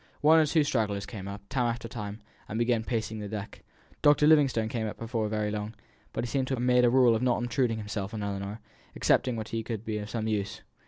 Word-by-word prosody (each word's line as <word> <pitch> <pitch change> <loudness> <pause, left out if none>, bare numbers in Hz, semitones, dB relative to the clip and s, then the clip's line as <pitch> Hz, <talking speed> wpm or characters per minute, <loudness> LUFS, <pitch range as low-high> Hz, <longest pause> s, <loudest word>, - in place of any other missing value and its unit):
One 160 +2 +7
or 155 - +4
two 155 +1 +3
stragglers 105 -7 0
came 100 -5 -7
up, 100 0 -8
time 125 -1 0
after 115 0 -3
time, 105 -2 -7 0.3
and 110 - -3
began 120 -1 +2
pacing 110 -2 -2
the 105 -1 -5
deck. 105 -1 -6 0.4
Dr. 145 0 +5
Livingstone 140 -8 +4
came 110 -1 -2
up 105 - -6
before 115 -1 -2
very 105 -1 -1
long; 105 +1 -4 0.4
but - - -3
he - - -2
seemed 130 +1 -1
to 130 - 0
have 120 - -3
made 125 0 +4
a 120 - +6
rule 125 -1 +5
of 110 - -1
not 125 -1 +2
obtruding 120 -1 0
himself 105 -2 -4
on 110 -2 -4
Ellinor, 100 +2 -4 0.3
excepting 125 -2 +2
when 110 -1 -4
he 115 +1 -3
could 110 -1 -5
be 110 -1 -2
of 105 0 -6
some 110 -1 -2
use. 105 -2 -2
115 Hz, 235 wpm, -29 LUFS, 105-125 Hz, 0.4 s, One